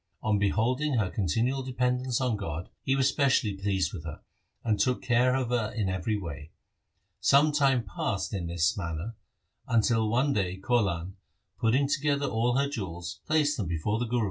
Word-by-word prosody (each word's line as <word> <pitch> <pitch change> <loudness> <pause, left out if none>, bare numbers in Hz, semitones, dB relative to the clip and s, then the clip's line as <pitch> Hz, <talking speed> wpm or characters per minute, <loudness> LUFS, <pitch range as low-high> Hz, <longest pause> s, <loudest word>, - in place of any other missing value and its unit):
On 105 -2 +2
beholding 125 +8 +1
her 110 -6 +1
continual 115 - 0
dependence 125 -1 0
on 125 -4 +1
God, 85 -4 -5
he 135 - +1
was 135 -1 +3
specially 130 -7 +2
pleased 95 -3 -1
with 85 -6 -6
her, 80 -3 -7 0.4
and 110 -3 +1
took 125 -1 +1
care 125 +1 +3
of 130 -3 -1
her 115 -3 0
in 105 -4 0
every 95 +4 -1
way. 80 -6 -7 0.7
Some 140 +9 +5
time 135 -4 +3
passed 100 +1 -3
in 90 -4 -3
this 85 -1 +1
manner, 85 +4 -4 0.5
until 110 -1 +2
one 130 +5 +2
day 95 -5 -1
Kaulan, 95 -5 0 0.4
putting 130 +5 +2
together 145 0 +1
all 120 +1 +1
her 140 +1 +2
jewels, 90 - -5
placed 150 -2 +2
them 105 - -2
before 85 +7 -1
the 120 - 0
Guru. 120 +2 0
115 Hz, 170 wpm, -28 LUFS, 95-130 Hz, 0.7 s, Some